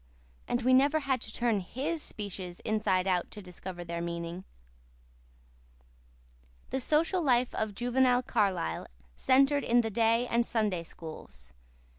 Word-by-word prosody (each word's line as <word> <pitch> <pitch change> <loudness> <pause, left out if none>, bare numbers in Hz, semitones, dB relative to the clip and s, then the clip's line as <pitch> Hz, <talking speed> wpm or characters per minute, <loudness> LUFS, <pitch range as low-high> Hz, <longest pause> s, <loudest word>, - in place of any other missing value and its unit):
And 240 0 -1
we 255 +1 +4
never 285 +4 +4
had 265 -4 0
to 220 - -6
turn 230 -2 +1
HIS 280 - -3
speeches 190 -7 -6
inside 210 -4 +1
out 180 -2 0
to 210 - -9
discover 180 -1 -8
their 170 0 -4
meaning. 170 +1 -5 2.3
The 265 - -1
social 325 +7 +2
life 250 -4 +2
of 215 -2 -2
juvenile 250 +2 +2
Carlisle 195 - 0 0.3
centred 275 +2 +3
in 240 +1 +4
the 225 -1 -3
day 230 +2 +3
and 235 -1 +2
Sunday 215 -7 0
Schools. 65 - -10
225 Hz, 135 wpm, -30 LUFS, 180-255 Hz, 2.3 s, we